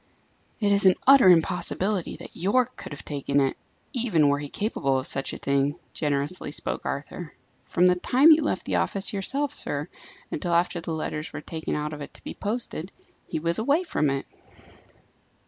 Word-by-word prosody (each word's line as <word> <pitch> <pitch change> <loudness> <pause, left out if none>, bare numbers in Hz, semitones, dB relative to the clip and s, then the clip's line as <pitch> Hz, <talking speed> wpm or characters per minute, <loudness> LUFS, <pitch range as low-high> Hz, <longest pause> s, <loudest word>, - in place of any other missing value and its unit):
"It 205 -2 +2
is 200 -1 +4
an 185 - +6
utter 270 -7 +8
impossibility 180 +2 +1
that - - -11
Yorke 215 +8 +1
could - - -9
have 145 - -8
taken 140 -1 0
it, 135 -1 +1 0.4
even 205 - +3
were 145 0 +1
he 145 -1 -6
capable 140 - -1
of 130 - -3
such 135 - +2
a - - -6
thing," 140 +1 0 0.2
generously 145 +2 -2
spoke - - -4
Arthur. 150 +3 -5 0.3
"From 180 - +1
the 180 - +6
time 255 - +5
you 310 0 +6
left 300 - -1
the - - 0
office 195 +1 0
yourself, 275 +9 -1
sir, 145 - 0 0.4
until 170 +3 -1
after 170 0 +1
the 165 - -5
letters 155 -1 -4
were 145 - -6
taken 160 0 -4
out 150 +1 -3
of 150 - -7
it 145 - -9
to - - -14
be - - -6
posted, 205 -5 -3 0.4
he - - -3
was 170 +3 0
away 285 +10 +2
from 150 - 0
it." 135 0 -2
170 Hz, 185 wpm, -26 LUFS, 145-205 Hz, 0.4 s, utter